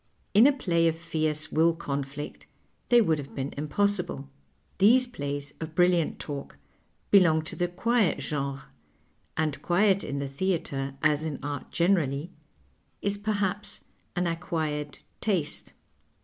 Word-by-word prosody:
In 220 +6 +8
a - - +6
play 170 -11 +1
of 165 - +1
fierce 155 -2 -2
will 165 +1 +3
eonlliet 140 -2 -5 0.4
they 240 -1 +7
would 160 -7 +2
have 140 -1 -8
been 135 0 -3
impossible. 175 -1 -1 0.5
These 240 +6 +6
plays 145 - -5
of 160 -1 -6
brilliant 175 -2 +3
talk 140 - -6 0.5
belong 165 -6 +6
to 160 - -6
the 175 - 0
qnict 210 +2 +1
genre, 140 -2 -3 0.7
and 155 -3 -1
quiet 195 +3 +3
in 140 - -3
the 140 0 -2
theatre, 140 -3 -2
as 150 0 +3
in 155 -3 -3
art 145 -1 -4
generally, 170 -3 +1 0.7
is 200 0 +1
pcrlia{)S 205 -1 -1 0.3
an 180 0 +1
acquired 160 -4 -2 0.2
taste. 185 -9 0
160 Hz, 135 wpm, -28 LUFS, 145-190 Hz, 0.7 s, In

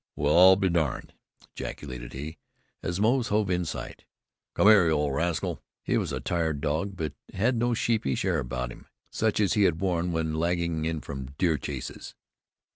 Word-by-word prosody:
"Well, 75 +1 +2
I'll 95 +2 +9
be 95 0 +1
darned!" 80 -8 -1 0.4
ejaculated 65 -4 -7
he, 75 +4 -7 0.4
as 90 +1 -3
Moze 120 +3 +2
hove 105 -2 +1
in 90 -1 0
sight. - - -6 0.5
"Come - - +3
hyar, 105 -5 +7
you 75 -2 +1
rascal!" 80 +4 -1 0.2
He - - 0
was - - 0
a - - -2
tired 80 -4 -1
dog, 80 +7 -1
but 80 -4 -3 0.2
had 115 +6 +2
no 120 +1 +1
sheepish 110 - 0
air 90 -4 +1
about 60 -2 -3
him, - - -13 0.2
such 110 -1 0
as 100 -3 +3
he 105 - +2
had 85 -3 +2
worn 90 -2 0
when 80 -1 -1
lagging 85 -1 0
in 80 -1 -2
from 65 0 -7
deer 85 -5 +2
chases. 70 -3 -6
85 Hz, 180 wpm, -27 LUFS, 75-95 Hz, 0.5 s, I'll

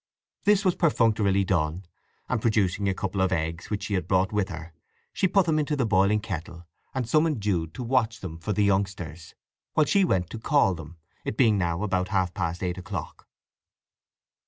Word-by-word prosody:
This 205 -1 +4
was 185 - +4
perfunctorily 110 - +2
done, 85 -1 -1 0.4
and 125 -3 -1
producing 100 -3 +1
a - - +1
couple 95 0 -2
of 95 -1 +2
eggs 80 -1 -2
which 105 -1 -2
she 105 - -3
had 95 - -1
brought 95 0 +2
with 105 -2 0
her 80 -1 -8 0.4
she 190 - +2
put 190 0 +3
them 155 -2 +2
into 150 0 0
the 130 -4 +1
boiling 105 0 +3
kettle, 85 -4 -6 0.3
and 130 -3 -1
summoned 155 +1 +2
Jude 85 -6 -1
to 125 - -5
watch 115 -2 +1
them 85 -5 -7
for 85 - -3
the 105 0 +2
youngsters, 95 -5 -1 0.4
while 155 - +4
she 200 +5 +3
went 90 - 0
to 115 - -6
call 125 -5 +3
them, 80 0 -10 0.3
it - - -4
being 115 -5 +5
now 85 +1 -1
about 95 -3 0
half 95 -4 0
past 85 +3 -3
eight 90 0 -2
o'clock. 95 -4 -7
100 Hz, 190 wpm, -26 LUFS, 90-115 Hz, 0.4 s, being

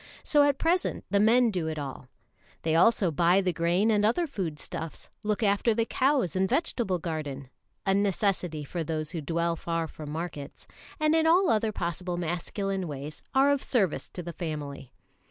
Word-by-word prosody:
So 295 - +4
at 285 -1 +2
present 345 +4 0
the 200 - +3
men 230 +3 +5
do 175 -5 -2
it 160 -1 -3
all. 135 -3 -6 0.6
They 160 - +1
also 185 +1 +4
buy 170 +5 +4
the 185 -2 0
grain 175 +6 +2
and 210 -1 +2
other 235 +11 +2
food 190 - -4
stuffs, 160 +2 -6
look 210 +2 -1
after 205 +2 +2
the 230 - +1
cows 260 - +1
and 190 0 +1
vegetable 240 - 0
garden 145 -5 -5 0.3
a 195 - +3
necessity 195 -5 0
for 165 +4 -4
those 155 -1 -3
who 170 -3 -4
dwell 170 +3 0
far 165 0 -2
from 155 -1 -9
markets 155 -2 -6 0.3
and 310 0 +3
in 320 0 +3
all 355 +3 +5
other 220 0 +1
possible 175 -1 -3
masculine 180 +3 -2
ways 145 +1 -7
are 275 +2 +5
of 285 -1 +1
service 200 - 0
to 180 - -7
the 170 0 -6
family. 145 -6 -5
180 Hz, 180 wpm, -28 LUFS, 160-220 Hz, 0.6 s, men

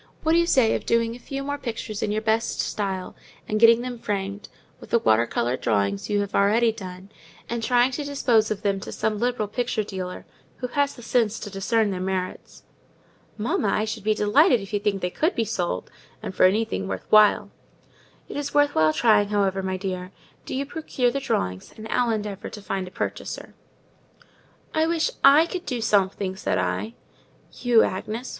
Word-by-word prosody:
What 320 - +2
do 335 - +5
you 340 - +2
say 255 -8 +4
to - - -3
doing 230 0 +1
a - - -11
few 275 +2 -5
more 285 +1 -3
pictures 225 -4 -5
in 205 - -1
your 215 +1 -1
best 220 +1 0
style, 190 -3 -3 0.3
and 215 - 0
getting 230 +1 +7
them 245 -1 -5
framed, 200 -1 -4 0.3
with - - -13
the - - +4
water 115 - +3
coloured 120 +2 -1
drawings 100 -3 0
you 205 -1 +1
have 200 0 -4
already 225 +4 +3
done, 190 -2 -9 0.4
and 235 0 -3
trying 245 +2 +3
to 290 +3 -3
dispose 245 -6 +2
of 215 -1 -3
them 200 -1 +1
to - - -8
some 215 -1 -1
liberal 240 -2 0
picture 230 0 -1
dealer, 185 -3 -6 0.3
who 255 - -4
has 285 +2 0
the 240 - -12
sense 225 -2 +1
to 205 - -6
discern 205 +2 +1
their 185 -1 -3
merits?" 185 -1 -4 0.7
"Mamma, 220 0 0
I 215 +2 +1
should 220 -1 -5
be 215 0 +2
delighted 245 - +4
if 195 +1 -10
you 205 - +1
think 200 -2 -1
they 180 - -1
could 325 - 0
be 230 - 0
sold; 175 - -3 0.3
and - - -5
for 185 - +4
anything 210 0 -1
worth - - -5
while." 215 -1 +5 0.8
"It's 285 0 -5
worth 290 0 +4
while 155 0 +3
trying, 210 -1 +4
however, 195 -2 +1
my 190 0 -2
dear: 185 -1 -4 0.4
do - - -4
you 275 +1 -1
procure 280 -5 -1
the 275 - -2
drawings, 95 - -3
and 220 0 -8
I'll 245 -1 +1
endeavour 210 -3 -3
to 210 - -9
find 195 -2 -3
a - - -7
purchaser." - - -5 1.2
"I 315 0 +2
wish 335 +7 +1
I 285 +4 +8
could 360 +1 -6
do 250 -3 -2
something," 195 -3 +1
said 90 - -1
I. 95 +5 -2 0.6
"You, 240 -3 +3
Agnes! 220 +6 -3
215 Hz, 195 wpm, -24 LUFS, 195-245 Hz, 1.2 s, I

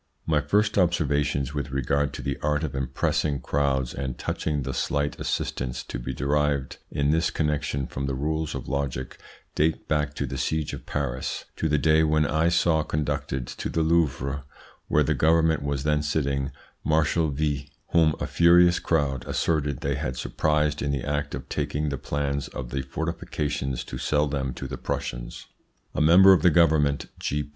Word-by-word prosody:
My 75 -2 +2
first 100 +8 +2
observations 75 -5 +1
with 70 -1 -3
regard 70 +2 0
to - - -6
the 70 - -2
art 75 +1 0
of 75 -4 -3
impressing 65 +2 0
crowds 65 -1 0
and 65 -3 -4
touching 75 -2 -2
the 65 0 -3
slight 70 +3 -1
assistance 60 0 -2
to - - -6
be 60 +2 -4
derived 70 -1 0
in 70 0 +1
this 80 +1 +2
connection 75 -3 -1
from 70 +2 -4
the 70 - -1
rules 80 +3 -2
of - - -5
logic 70 -2 -3 0.3
date 80 +1 0
back 75 -1 0
to - - -2
the 65 - -5
seige 80 +3 -1
of - - -8
Paris, 65 +1 -3
to 80 - -1
the 75 - +3
day 80 +2 +4
when 75 0 +3
I 80 +3 +2
saw 85 -2 +3
conducted 70 -4 -2
to - - -5
the 80 - 0
Louvre, 70 -4 +1 0.4
where - - +3
the - - +1
Government 80 -1 +3
was 70 -1 -2
then 75 0 +2
sitting, 70 -2 0 0.3
Marshal 80 +1 +2
V, 70 0 -2 0.2
whom 80 -2 +4
a - - -1
furious 85 +1 +5
crowd 70 -6 0
asserted 75 -5 0
they - - 0
had 65 - -3
surprised 75 +4 0
in 70 - 0
the 70 -3 -2
act 75 0 -1
of - - -8
taking 75 +1 -2
the 70 - -3
plans 70 0 -2
of 60 -1 -7
the 70 +1 -1
fortifications 70 -2 -3
to 60 - -7
sell 75 0 +1
them 70 -2 -2
to 65 - -5
the - - -6
Prussians. - - -4 0.5
A - - -1
member 90 +5 +8
of 90 - +3
the 90 - +6
Government 75 -3 +3
(G. 75 0 -2
75 Hz, 180 wpm, -26 LUFS, 70-80 Hz, 0.5 s, member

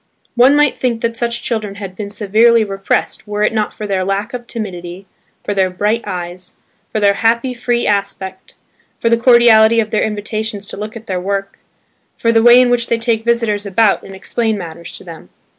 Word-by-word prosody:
One 255 +4 +5
might 295 -2 +2
think 235 -3 -1
that 230 0 -1
such 235 0 -2
children 215 -4 -3
had 195 -2 -8
been 200 0 -6
severely 220 +3 +3
repressed 195 +1 -2
were 210 0 -2
it 215 - +1
not 215 -1 -1
for 215 - -6
their 195 -2 -1
lack 195 +4 -2
of 240 -1 -6
timidity, 185 -5 -7 0.4
for 205 - -2
their 190 -2 +1
bright 210 +5 -1
eyes, 180 -1 -6 0.4
for 215 - -1
their 200 -1 +4
happy, 230 +4 +1
free 240 0 -1
aspect, 195 -2 -3 0.4
for 230 - +1
the - - +6
cordiality 230 -2 +5
of 215 -1 -1
their 215 - +1
invitations 210 0 -3
to - - -8
look 215 +3 -6
at 225 -1 -9
their 185 -3 -3
work, 195 +1 -3 0.6
for 230 - +1
the 225 -1 +4
way 240 +1 +7
in 250 -1 +3
which 235 -1 +1
they 235 - +1
take 225 -1 0
visitors 225 -3 0
about 200 +1 +2
and 195 - -11
explain 220 +3 -2
matters 170 -2 -8
to - - -13
them. 165 -3 -11
215 Hz, 200 wpm, -16 LUFS, 195-230 Hz, 0.6 s, way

